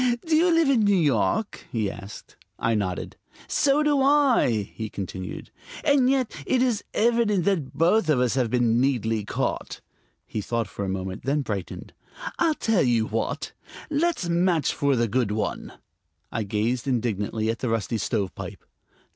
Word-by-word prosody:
"Do 325 -1 +2
you 345 +3 +4
live 330 -2 +4
in 270 -4 +4
New 205 -2 +3
York?" 160 - 0
he 110 -5 0
asked. 105 0 -11 0.2
I 115 - 0
nodded. 95 -4 -3 0.3
"So 285 +1 +2
do 290 -2 +2
I," 265 - +3
he 110 -1 -5
continued; 95 -2 -6 0.3
"and 275 -3 +4
yet 265 -3 +1
it 255 -1 +3
is 240 -5 0
evident 220 -5 +2
that 175 -9 0
both 175 +4 +3
of 145 -5 +3
us 125 -2 +2
have 125 -3 +1
been 120 0 +2
neatly 115 -5 0
caught." 105 - -3 0.5
He 105 - -4
thought 115 +2 -2
for 100 - -6
a 95 - -2
moment, 95 0 -4
then 140 +2 +1
brightened. 100 -6 -5 0.5
"I'll 325 -2 +3
tell 225 -8 +1
you 120 -3 +2
what; 110 +1 -3 0.4
let's 310 - 0
match 170 -2 +2
for 140 -1 +1
the 120 -1 +1
good 120 0 0
one." 105 +1 -3 0.6
I 110 - -2
gazed 115 +5 -1
indignantly 110 -3 -1
at 115 - -6
the 125 - -2
rusty 115 0 -1
stovepipe. 100 -1 -3
130 Hz, 165 wpm, -25 LUFS, -, 0.6 s, you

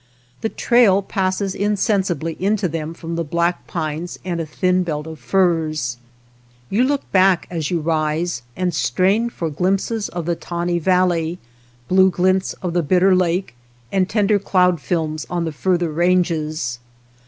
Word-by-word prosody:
The 220 - -1
trail 215 -6 +3
passes 190 0 -1
insensibly 195 - 0
into 200 +1 +1
them 160 0 -4
from 165 0 -6
the 170 - 0
black 170 +3 -1
pines 155 +3 -4
and 175 -2 -2
a 160 - -5
thin 180 +4 +1
belt 155 -4 -3
of 160 -1 -8
firs. 155 -3 0 0.7
You 225 +5 +3
look 280 +1 -1
back 185 -2 +4
as 160 -4 -2
you 175 - 0
rise, 155 -1 -1
and 180 -1 -1
strain 190 - +1
for 165 -8 -4
glimpses 195 +7 -1
of 175 -2 -5
the 170 0 0
tawny 175 +1 -2
val 185 +2 +3
ley, 170 -1 -1 0.5
blue 190 +1 +5
glints 185 +1 +1
of 175 -2 -2
the 175 - +2
Bitter 185 +5 +3
Lake, 180 -3 0 0.4
and 190 -1 +1
tender 205 -1 +2
cloud 180 -4 +2
films 155 -3 -2
on 175 -1 -1
the 160 - -2
farther 175 +1 0
ranges. 155 -7 0
175 Hz, 155 wpm, -20 LUFS, 160-190 Hz, 0.7 s, blue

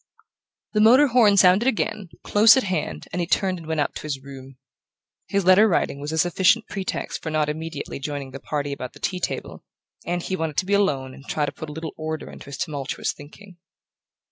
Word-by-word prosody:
The 210 - +3
motor 250 +7 +7
horn 225 -5 +5
sounded 190 +5 +5
again, 215 -5 -1
close 220 +4 +6
at 260 - +2
hand, 130 - -3
and 180 - -2
he 170 - -1
turned 185 -1 +1
and 165 - -12
went 160 -2 0
up 145 - -1
to - - -7
his 145 -3 -4
room. 135 -1 -12 0.7
His 200 -2 0
letter 185 +4 +7
writing 165 -7 0
was 145 +2 -5
a 160 - -2
sufficient 185 +7 +3
pretext 195 -2 -4
for 160 - -4
not 155 -1 0
immediately 160 -2 -5
joining 140 -1 -5
the 135 - -8
party 145 0 -3
about 125 -2 -7
the - - -14
tea 185 - -2
table, - - -4 0.4
and 175 0 -2
he 190 - -2
wanted 160 -4 -3
to - - +1
be 200 - -1
alone 140 -10 +1
and 135 - -13
try 150 - 0
to - - -4
put 155 - -8
a - - -7
little 160 0 -6
order 155 -1 -5
into - - -12
his 140 -1 -7
tumultuous 145 -5 -3
thinking. 175 +6 -14
160 Hz, 215 wpm, -23 LUFS, 145-195 Hz, 0.7 s, motor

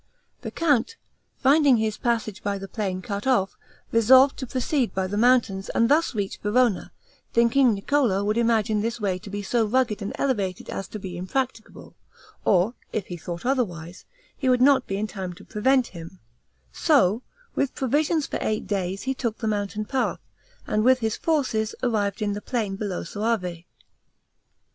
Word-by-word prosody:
The - - -5
count, 305 - +1 0.4
finding 280 -1 +5
his 220 -1 -1
passage 225 -4 -2
by 200 0 -2
the 195 0 -7
plain 190 -3 -3
cut 200 +4 -4
off, 195 -8 +2 0.4
resolved 260 +4 +6
to 260 - -5
proceed 255 +1 -1
by 190 0 0
the 190 +2 -4
mountains, 225 -4 +2
and 230 +1 +3
thus 305 -2 +2
reach 200 -2 -3
Verona, 225 0 +1 0.4
thinking 235 0 +4
Niccolo 200 -2 +1
would 210 +1 0
imagine 220 -2 +2
this 230 +2 -2
way 190 -4 -1
to 200 - -11
be 205 +1 -4
so 230 +3 +1
rugged 225 -1 +1
and 200 - -3
elevated 200 -9 -2
as 195 - -4
to - - -7
be 190 -3 -7
impracticable, 235 +5 -4 0.5
or 195 +4 +3 0.2
if 205 - -2
he 175 - -6
thought 170 +2 -7
otherwise, 185 -10 -2 0.3
he 265 - -1
would 250 -1 +4
not 265 0 +4
be 195 - -2
in 210 - -1
time 190 -4 -6
to - - -15
prevent 255 +4 +2
him; 170 +1 -10 0.5
so, 245 - +3 0.3
with 275 - -1
provisions 295 +4 +1
for - - -4
eight 215 0 -1
days, 195 -1 -2
he 265 - -1
took 235 -4 -3
the 225 - -3
mountain 205 0 -2
path, 265 +3 -2 0.4
and 215 - 0
with 255 +2 +5
his 220 -1 0
forces, 255 -9 0
arrived 215 -4 0
in 205 -1 0
the 205 - -5
plain, 215 -6 -2
below 195 -3 -3
Soave. 180 -4 -2
220 Hz, 170 wpm, -25 LUFS, 195-255 Hz, 0.5 s, resolved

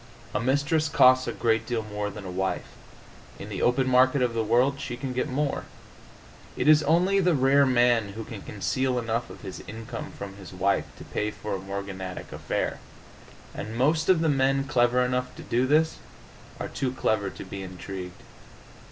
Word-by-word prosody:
A 105 - +1
mistress 145 +5 +1
costs 130 -2 +5
a - - 0
great 115 -1 0
deal 115 -3 -1
more 105 -1 -3
than 105 -1 -9
a 90 - -5
wife; 95 +1 -2 0.7
in - - -8
the - - -4
open 125 +2 +2
market 130 +1 +4
of 120 -2 0
the 115 -1 0
world 125 +5 +2
she 120 - -4
can 130 0 -4
get 125 - -1
more. 140 +2 -1 0.9
It - - 0
is 155 0 +7
only 175 +6 +3
the 180 -3 +3
rare 135 +1 +4
man 120 -5 +3
who 110 +2 -6
can 110 -2 -8
conceal 130 +5 -1
enough 115 0 -1
of - - -11
his 95 -2 -7
income 115 +2 -7
from 100 -1 -7
his 95 -2 -11
wife 95 +2 +1
to - - -10
pay 105 - -2
for 105 0 -6
a - - -4
morganatic 95 -1 -6
affair. - - -2 0.7
And 110 +2 -6
most 155 +7 +2
of 180 -3 +5
the 165 - +2
men 135 -1 +2
clever 125 -2 +2
enough 125 0 -2
to - - -9
do 125 +2 +1
this 155 +3 +3 0.6
are - - -3
too 130 -2 -2
clever 110 -5 0
to - - -9
be 95 +1 -7
intrigued. 90 -1 -7
120 Hz, 185 wpm, -26 LUFS, 105-135 Hz, 0.9 s, is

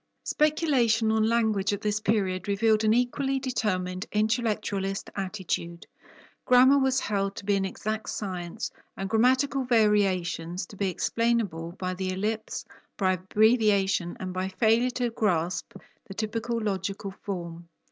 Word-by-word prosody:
Speculation 265 -8 +2
on 220 0 +2
language 220 -4 +1
at 205 - -3
this 210 0 0
period 195 -4 0
revealed 215 +2 +2
an 215 - +4
equally 260 +3 +1
determined 210 -7 -2
intellectualist 210 -3 -1
attitude. 185 -3 -4 0.6
Grammar 260 +2 +6
was 265 -1 +2
held 195 -1 -1
to - - -8
be 205 0 +2
an 195 -1 0
exact 215 +3 -4
science, 185 +1 -4 0.3
and 195 - -3
grammatical 260 +4 +3
variations 190 -7 +1
to 205 - -13
be 195 -1 0
explainable 195 -5 -1
by 185 0 -3
the 185 0 -3
ellipse, 215 +4 -3 0.3
by 190 -2 +2
abbreviation, 195 -2 +2
and 185 -1 -5
by 185 +1 -2
failure 225 +5 +2
to 245 -1 -2
grasp 180 -6 -1 0.4
the 195 - -9
typical 225 +2 -2
logical 195 -1 -3
form. 170 -3 -6
210 Hz, 135 wpm, -27 LUFS, 185-230 Hz, 0.6 s, Grammar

